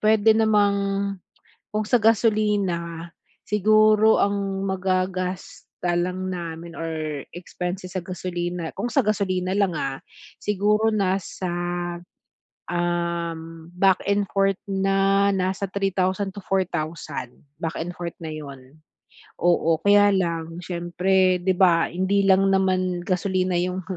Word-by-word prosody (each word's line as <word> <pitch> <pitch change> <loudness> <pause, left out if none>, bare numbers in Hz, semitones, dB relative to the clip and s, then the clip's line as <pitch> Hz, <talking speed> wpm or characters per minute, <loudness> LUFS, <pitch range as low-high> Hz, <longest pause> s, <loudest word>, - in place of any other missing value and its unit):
puwede 220 0 +5
namang 210 -2 +3 1.0
kung 215 0 0
sa 245 - +3
gasolina 205 -7 +1 0.4
siguro 215 +1 +4
ang 195 -1 -1
magagasta 185 -1 -2
lang 180 +2 -1
namin 170 -1 -6
or 155 -3 -4
expenses 180 +1 -6
sa 185 - -1
gasolina, 175 -2 -4
kung 205 +5 -2
sa 275 - +2
gasolina 185 -3 0
lang 200 -2 +2
ah. 135 -2 -3 0.4
Siguro 210 +2 +2
nasa, 190 -2 -1 1.2
um, 170 -1 -3
back 190 0 +3
and 200 0 +2
forth 195 -1 +2
na 195 0 +2
nasa 190 +1 -1
3,000 195 0 0
to 205 - -7
4,000 165 -7 -2 0.3
back 165 -1 -3
and 175 +2 -4
forth 170 -1 -5
na 160 - -5
yun. 140 -1 -10 0.6
Oo 165 -2 +3
kaya 205 0 +6
lang 165 -3 -2
siyempre 180 +1 +1
di 190 +1 +2
ba, 175 -3 +4
hindi 190 +3 +1
lang 195 0 +5
naman 185 -2 +1
gasolina 185 0 0
yung 180 +1 -2
185 Hz, 115 wpm, -24 LUFS, 175-200 Hz, 1.2 s, kaya